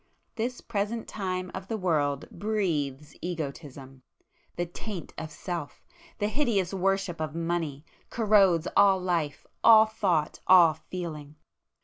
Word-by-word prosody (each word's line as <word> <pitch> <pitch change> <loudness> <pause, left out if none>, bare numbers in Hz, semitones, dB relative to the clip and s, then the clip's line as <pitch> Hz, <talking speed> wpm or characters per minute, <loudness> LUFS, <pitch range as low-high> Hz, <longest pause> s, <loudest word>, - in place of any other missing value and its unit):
This 245 +2 -3
present 215 +2 -3
time 185 -3 -3
of 190 0 -6
the 225 - -2
world 150 -7 0
breathes 155 -10 -2
Egotism,—the 140 -1 -7
taint 175 +1 -7
of 160 - -6
Self, 170 -2 -6 0.3
the 205 - 0
hideous 215 - 0
worship 195 -3 0
of 155 0 -3
money, 165 -4 -2 0.2
corrodes 200 -7 +3
all 195 -1 +6
life, 170 -5 -2 0.2
all 220 -1 +8
thought, 190 -8 0
all 175 -4 +7
feeling. 155 -3 -7
180 Hz, 115 wpm, -28 LUFS, 155-200 Hz, 0.3 s, all